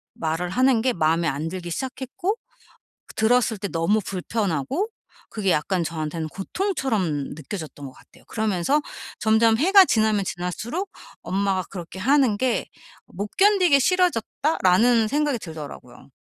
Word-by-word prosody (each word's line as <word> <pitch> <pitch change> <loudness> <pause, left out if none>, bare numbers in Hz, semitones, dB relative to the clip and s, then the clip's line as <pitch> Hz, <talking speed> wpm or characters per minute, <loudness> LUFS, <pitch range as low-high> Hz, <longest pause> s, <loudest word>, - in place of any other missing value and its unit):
말을 165 +2 -2
하는 255 0 +3
게 255 -1 +2
마음에 165 +1 +1
안 155 +2 -2
들기 175 -1 -6
시작했고 265 - -3 0.7
그 - - -14
들었을 225 0 +2
때 200 - -3
너무 180 +6 +1
불편하고 195 - -2 0.4
그게 200 -4 -1
약간 175 +4 0
저한테는 160 -1 -4
고통처럼 200 - -2
느껴졌던 155 -3 -7
것 130 - -9
같아요. - - -21
그러면서 220 - 0 0.4
점점 220 +1 +4
해가 380 - +7
지나면 215 - +2
지날수록 215 - -4 0.3
엄마가 195 -1 0
그렇게 180 0 -8
하는 260 -2 +3
게 255 0 0 0.4
'못 200 +3 -5
견디게 380 -7 +5
싫어졌다.'라는 245 - +2
생각이 290 -1 +1
들더라고요. 160 -6 -10
215 Hz, 325 characters per minute, -23 LUFS, 175-265 Hz, 0.7 s, 해가